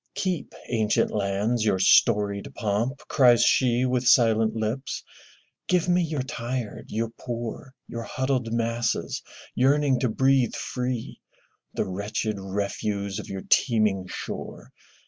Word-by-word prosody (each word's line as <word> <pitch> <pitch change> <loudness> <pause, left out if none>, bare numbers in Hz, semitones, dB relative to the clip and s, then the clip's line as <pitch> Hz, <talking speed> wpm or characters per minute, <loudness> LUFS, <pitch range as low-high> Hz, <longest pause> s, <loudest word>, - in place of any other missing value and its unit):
'*Keep, 185 -5 -2
ancient 110 -3 +1
lands, 105 +3 0
your 105 -3 +2
storied 100 +4 +3
pomp!'' 115 +5 -1
cries 120 -3 +5
she 125 -1 +3
With 125 -1 0
silent 115 -2 +4
lips. 110 +5 -3 0.6
Give 180 -1 +2
me 180 0 +3
your 155 -5 -2
tired, 120 -3 -4
your 115 +1 -2
poor. 120 +2 -6
Your 115 - -5
huddled 130 -1 -2
masses 115 0 -1 0.3
yearning 135 0 +3
to 125 - +1
breathe 130 +1 +2
free, 125 -2 -4 0.5
The - - 0
wretched 100 +2 -3
refuse 100 +1 -3
of - - -8
your 95 -1 -5
teeming 105 -6 +2
shore. - - -7
115 Hz, 125 wpm, -25 LUFS, 105-130 Hz, 0.6 s, cries